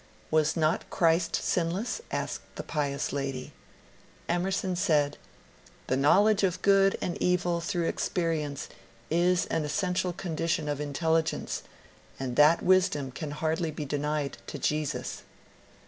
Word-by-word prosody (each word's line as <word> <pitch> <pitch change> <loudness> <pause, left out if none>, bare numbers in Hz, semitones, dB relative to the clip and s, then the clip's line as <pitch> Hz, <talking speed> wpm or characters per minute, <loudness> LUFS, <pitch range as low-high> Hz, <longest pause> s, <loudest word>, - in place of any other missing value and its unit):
" - - -29
Was 155 +1 +2
not 155 0 +1
Christ 165 0 +2
sinless?" 185 - -1
asked - - -3
the - - -5
pious 140 -4 -2
lady. 135 -2 -3 0.7
Emerson 185 +1 0
said, 150 -6 +2 0.7
^'The 130 - +1
knowledge 200 +9 +5
of 185 -1 0
good 195 -1 +5
and 175 - -3
evil 175 -1 +1
through 170 0 -1
experience 155 -5 -1 0.4
is 175 +3 +3
an 165 - +1
essential 180 +3 0
condition 165 -3 -2
of 145 -1 -2
intelligence, 160 +2 0 0.6
and 130 -2 -3
that 150 +4 +5
wisdom 175 -7 +3
can 150 +3 -5
hardly 160 +2 -1
be 150 -1 -5
de 145 +1 -2
nied 150 -1 -1
to - - -5
Jesus." 150 -1 -2
165 Hz, 130 wpm, -28 LUFS, 150-180 Hz, 0.7 s, knowledge